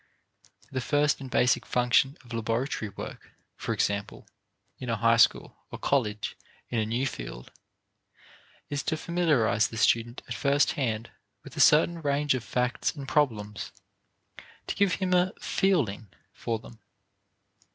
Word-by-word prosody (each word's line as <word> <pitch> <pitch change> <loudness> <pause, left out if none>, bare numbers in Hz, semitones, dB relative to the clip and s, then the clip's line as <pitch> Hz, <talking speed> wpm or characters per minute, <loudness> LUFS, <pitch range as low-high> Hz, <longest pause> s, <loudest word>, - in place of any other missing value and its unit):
The 130 -1 -2
first 145 +2 +1
and 135 - -7
basic 125 0 +3
function 125 +3 +2
of 120 - -10
laboratory 115 0 -2
work, 100 - -9 0.2
for - - -4
example, 100 0 -2 0.5
in 125 - -5
a 115 - +1
high 115 +1 +3
school 115 - +3
or - - -7
college 110 -7 -1 0.4
in 120 - 0
a 110 - 0
new 120 +4 0
field, - - -6 1.2
is 145 0 -2
to 160 - -1
familiarize 150 -10 +2
the 115 - -8
student 120 0 +1
at 120 - -4
first 140 +3 +2
hand 115 -4 -2 0.3
with - - -12
a - - -6
certain 165 +2 +5
range 145 -1 +1
of 130 -3 -3
facts 125 +6 -1
and 140 -3 -7
problems 105 -9 0 0.9
to - - -2
give 200 -2 +2
him 185 -2 -1
a 180 +1 +3
"feeling" 130 - 0 0.3
for 115 -1 -3
them. 110 +1 -14
125 Hz, 145 wpm, -28 LUFS, 115-145 Hz, 1.2 s, certain